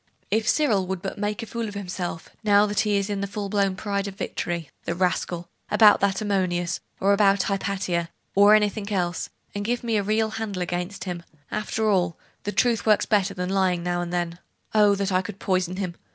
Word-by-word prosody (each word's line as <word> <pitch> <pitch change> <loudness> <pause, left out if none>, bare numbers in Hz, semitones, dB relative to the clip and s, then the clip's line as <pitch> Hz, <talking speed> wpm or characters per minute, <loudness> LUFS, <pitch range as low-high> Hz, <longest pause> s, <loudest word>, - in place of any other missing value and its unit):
'If 215 0 +2
Cyril 215 -12 +2
would 190 -1 -4
but 195 - -4
make 210 +1 -2
a - - -4
fool 230 0 -4
of 205 - -7
himself, 180 -4 -4
now 205 -1 +5
that 205 0 -1
he 210 -2 +2
is 200 0 0
in 200 -2 -2
the 200 - -1
full 200 0 -4
blown 195 -2 +1
pride 200 0 -2
of 195 - -7
victory 170 -4 -3 0.2
the 170 - -1
rascal! 175 -1 -1 0.2
about 210 0 +6
that 200 +1 +1
Ammonius, 180 -4 0 0.2
or 200 +1 +4
about 200 -1 +4
Hypatia, 190 -4 -1 0.2
or 205 +2 +7
anything 210 0 0
else, 180 -3 -1 0.2
and 205 - -3
give 240 +3 -1
me 230 -2 +1
a - - +2
real 215 +2 +1
handle 205 -5 -3
against 175 +3 -3
him! 180 -3 -4 0.3
After 215 +1 -1
all, 180 -5 +2 0.3
truth 230 +2 +2
works 215 -1 +4
better 200 -2 +1
than 180 -1 -2
lying 185 -3 +1
now 175 0 0
and 175 0 -4
then. 175 -1 -2 0.3
Oh, 210 -2 +5
that 200 0 -1
I 185 0 +3
could 190 +1 -7
poison 185 -2 0
him! 185 -2 -3
200 Hz, 205 wpm, -25 LUFS, 180-210 Hz, 0.3 s, or